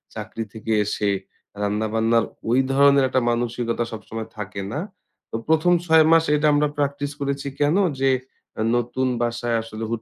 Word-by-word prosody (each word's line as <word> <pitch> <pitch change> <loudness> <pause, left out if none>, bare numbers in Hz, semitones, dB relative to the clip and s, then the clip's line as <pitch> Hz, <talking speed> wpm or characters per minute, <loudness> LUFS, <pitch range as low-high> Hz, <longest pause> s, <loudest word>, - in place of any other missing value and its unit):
চাকরি 115 - -5
থেকে 110 0 -5
এসে 105 0 -1 0.5
রান্না-বান্নার 110 +2 +1 0.2
ঐ - - +1 0.2
ধরনের 140 0 +5
একটা 130 -1 +1
মানসিকতা 120 0 -1
সবসময় 110 0 -6
থাকে 100 -1 -5
না। 150 - -2 0.5
তো - - -4
প্রথম 160 +3 +4
৬ 160 -1 +6
মাস 165 0 +6
এটা 150 +1 +2
আমরা 150 0 +3
প্র্যাকটিস 145 0 -1
করেছি 140 0 -2
কেন? 145 +4 +3 0.2
যে 135 0 +3 0.7
নতুন 120 +2 0
বাসায় 120 0 -1
আসলে 115 0 -7
হুট 115 -1 -2
120 Hz, 150 wpm, -23 LUFS, 115-140 Hz, 0.7 s, ৬